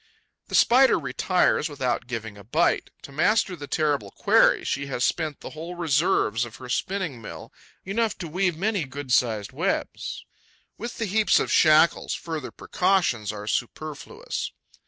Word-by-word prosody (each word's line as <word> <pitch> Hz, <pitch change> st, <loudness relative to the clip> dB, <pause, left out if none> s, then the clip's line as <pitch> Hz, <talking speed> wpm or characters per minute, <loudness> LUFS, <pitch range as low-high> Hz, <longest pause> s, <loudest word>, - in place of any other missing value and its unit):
The -, -, -3 dB
Spider 260 Hz, +3 st, +6 dB
retires 180 Hz, -4 st, +1 dB
without 130 Hz, -5 st, -2 dB
giving 115 Hz, -4 st, -5 dB
a 100 Hz, -, -13 dB
bite. 155 Hz, -, +1 dB
To -, -, -10 dB
master 185 Hz, +6 st, +2 dB
the 145 Hz, -4 st, -8 dB
terrible 145 Hz, -11 st, 0 dB
quarry, -, -, +3 dB
she 140 Hz, +1 st, -2 dB
has 125 Hz, -3 st, -2 dB
spent 155 Hz, -2 st, -1 dB
the -, -, -8 dB
whole 165 Hz, +3 st, -7 dB
reserves 155 Hz, -, +1 dB
of 115 Hz, -2 st, -7 dB
her 125 Hz, +3 st, -10 dB
spinning 180 Hz, -3 st, -2 dB
mill, 105 Hz, -, -9 dB, 0.3 s
enough 220 Hz, +3 st, -1 dB
to 175 Hz, -, -6 dB
weave 180 Hz, +1 st, 0 dB
many 200 Hz, -2 st, 0 dB
good 135 Hz, -1 st, -5 dB
sized 110 Hz, -5 st, +1 dB
webs. -, -, -3 dB, 0.5 s
With 235 Hz, +2 st, -7 dB
this 225 Hz, -6 st, -3 dB
heap 220 Hz, +1 st, +1 dB
of -, -, 0 dB
shackles, 155 Hz, 0 st, +4 dB
further 160 Hz, -5 st, -5 dB
precautions 175 Hz, -, 0 dB
are 105 Hz, -1 st, -7 dB
superfluous. 155 Hz, -, -4 dB
155 Hz, 155 wpm, -25 LUFS, 125-185 Hz, 0.5 s, Spider